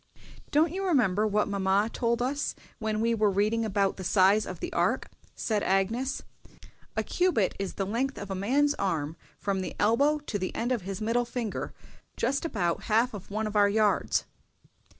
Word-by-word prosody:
"Don't 305 +2 +3
you 385 +1 -2
remember 220 - +2
what 210 0 +1
mamma 200 +1 +2
told 235 0 0
us 280 +3 -1 0.2
when 220 -1 -1
we 230 +1 +2
were 215 -2 +3
reading 210 +4 +1
about 200 -2 +1
the 190 - -6
size 195 +3 +4
of - - -6
the - - -5
Ark?" - - +1 0.3
said 215 -2 -1
Agnes. 220 +9 0 0.7
"A - - +2
cubit 355 - +1
is 195 -1 -3
the 195 - -1
length 250 +7 -1
of 200 -1 -6
a - - 0
man's 270 +10 +2
arm 160 -5 -1 0.2
from 195 -2 -1
the 185 - -5
elbow 280 +8 +3
to 285 -9 -4
the 185 - -3
end 240 +2 -1
of 245 -4 +1
his 195 +3 -5
middle 230 +3 +1
finger, 235 -3 -4 0.5
just 275 +4 0
about 180 - -1
half 230 +3 +2
of 205 -3 -8
one 215 +2 -2
of 215 0 -4
our 205 -1 +5
yards." 210 0 +2
215 Hz, 185 wpm, -28 LUFS, 195-245 Hz, 0.7 s, our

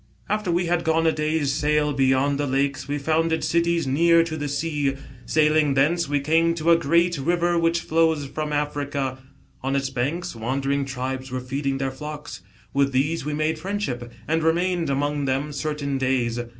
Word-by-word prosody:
" - - -31
After 210 -4 -3
we 175 +1 +1
had 170 0 0
gone 160 0 +2
a 160 - +5
day's 150 -2 0
sail 150 0 +1
beyond 135 +1 +2
the 145 - 0
lakes, 135 0 -1
we 145 +1 -1
founded 160 +3 0
cities 170 -1 +1
near 165 +5 +4
to 165 -1 -4
the 145 -1 -3
sea. 145 -1 -1 0.3
Sailing 155 -2 +3
thence, 155 +4 +2
we 145 0 +1
came 165 +4 +2
to 165 0 +2
a - - +8
great 170 0 +2
river 175 +4 +1
which 165 0 +1
flows 160 -3 +1
from 150 +2 -4
Africa. 145 -2 -2 0.4
On 135 +1 -1
its 135 -1 -1
banks 140 +5 -2
wandering 135 +4 -1
tribes 130 0 -4
were 130 0 -3
feeding 135 +2 -2
their 135 0 -2
flocks. 150 -5 -8 0.3
With 140 -1 +2
these 145 +4 0
we 150 0 -2
made 155 +1 0
friendship, 155 -11 -3 0.2
and 160 +1 +1
re 160 0 +3
mained 175 -1 0
among 145 +1 0
them 135 +3 -1
certain 140 -2 -2
days. 125 -3 0
150 Hz, 185 wpm, -24 LUFS, 135-165 Hz, 0.4 s, a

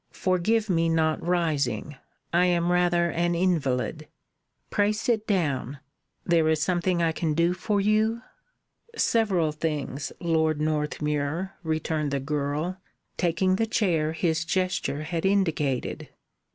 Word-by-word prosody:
"Forgive 210 +5 +1
my 165 -3 +2
not 160 -1 +1
rising. 150 -7 -1 0.4
I 180 +1 +4
am 175 0 +2
rather 175 -1 +2
an 175 0 0
invalid. 155 -4 0 0.6
Pray 205 0 +2
sit 220 0 -1
down. 145 - 0 0.5
There 165 -2 +3
is 160 -1 +2
something 175 +1 +1
I 165 - +2
can 160 -1 -1
do 170 +2 +2
for 205 +3 -1
you?" 215 +3 +1 0.7
"Several 195 - +2
things, 150 -3 -3
Lord 160 -3 +1
Northmuir," 150 +2 -1
returned 155 -2 -1
the 140 0 -1
girl, 150 +5 -2 0.4
taking 185 +2 +1
the 225 - 0
chair 165 -8 +1
his 160 -1 0
gesture 175 -4 -1
had 165 +1 -3
indicated. 165 -9 0
170 Hz, 125 wpm, -26 LUFS, 155-185 Hz, 0.7 s, I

